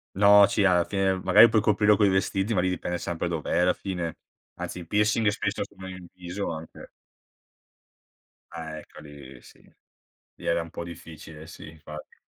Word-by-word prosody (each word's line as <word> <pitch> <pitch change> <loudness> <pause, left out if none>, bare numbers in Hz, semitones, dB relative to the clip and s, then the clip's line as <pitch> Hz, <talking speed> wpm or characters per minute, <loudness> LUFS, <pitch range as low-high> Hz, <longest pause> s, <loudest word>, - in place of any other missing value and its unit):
No, 100 0 +7
sì, 100 0 +1
alla 90 -2 +4
fine, 95 0 0
magari, 105 +5 +7
puoi 110 -1 +2
coprirlo 105 0 +3
coi 100 -1 +3
vestiti, 95 +3 0
ma 90 - +1
lì 90 - +1
dipende 90 -1 -3
sempre 85 0 -4
dov'è, 85 +1 -1
alla 90 +1 +4
fine. 90 -4 -5 0.4
Anzi, 90 - -6
il 85 - -10
piercing 105 +2 +1
spesso, 100 -1 -2
sono 95 -1 -12
in 90 -1 -9
viso, 90 +1 -5
anche. 80 0 -9 1.7
Ecco 80 -2 -9
li 70 -4 -13
sì, - - -18 0.7
lì - - -13
era 85 0 +1
un 80 - -13
po' - - -6
difficile, 80 -2 -11
sì, 80 - -11
infatti. 75 -1 -12
90 Hz, 165 wpm, -26 LUFS, 80-100 Hz, 1.7 s, No